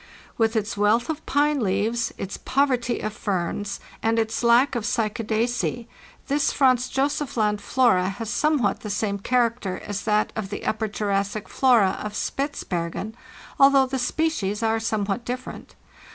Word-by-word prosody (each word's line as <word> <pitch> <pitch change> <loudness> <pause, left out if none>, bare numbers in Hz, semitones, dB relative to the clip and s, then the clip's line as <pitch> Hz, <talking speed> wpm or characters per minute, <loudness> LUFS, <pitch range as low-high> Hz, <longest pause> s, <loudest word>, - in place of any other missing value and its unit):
"With 225 0 +1
its 215 0 -1
wealth 215 +7 +2
of 315 - -7
pine 290 0 +2
leaves, 220 +3 0
its 195 - -5
poverty 255 -3 0
of 215 - -3
ferns, 200 +1 -3 0.2
and 225 +1 +1
its 225 0 0
lack 240 +4 +4
of 240 -3 -2
Cycadacee, 230 +2 -1 0.4
this 285 +1 +1
Franz 255 -3 +3
Josef 275 0 -1
Land 210 -2 +1
flora 210 -8 +3
has 215 +3 -5
somewhat 290 -10 +1
the 210 - -7
same 200 0 -1
character 230 -4 0
as 205 -1 -3
that 210 0 +1
of 215 -3 -4
the 205 - -6
Upper 220 0 0
Juras 200 -1 0
sic 210 0 -6
flora 240 -8 +3
of 210 0 -5
Spitzbergen, 215 - -3 0.5
although 275 -1 +6
the 260 0 -3
species 235 -8 -1
are 225 0 +2
some 220 -2 -1
what 200 +4 -2
different. 250 +2 -7
225 Hz, 155 wpm, -24 LUFS, 205-255 Hz, 0.5 s, although